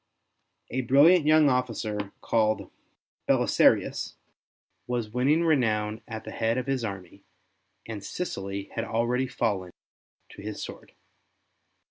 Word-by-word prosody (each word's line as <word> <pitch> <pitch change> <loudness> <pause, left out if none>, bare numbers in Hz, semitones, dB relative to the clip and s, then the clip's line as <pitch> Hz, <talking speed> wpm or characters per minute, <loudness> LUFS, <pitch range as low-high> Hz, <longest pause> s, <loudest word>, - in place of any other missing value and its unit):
A 130 - 0
brilliant 145 +7 +5
3^oung 155 -1 +6
officer 110 -6 -1
called 110 -1 0 0.6
Belisarius - - +2 0.7
was 120 -3 -2
winning 140 +7 +2
renown 110 -9 +1
at 110 -1 -6
the - - -8
head 115 +2 0
of 130 - -2
his 135 -3 -1
army, 100 -2 -7 0.6
and 105 -3 -6
Sicily 100 - -5
had 115 - -2
already 120 +3 0
fallen 105 -7 -1 0.6
to - - -12
his 105 0 -6
sword. - - -9
115 Hz, 115 wpm, -27 LUFS, 105-130 Hz, 0.7 s, 3^oung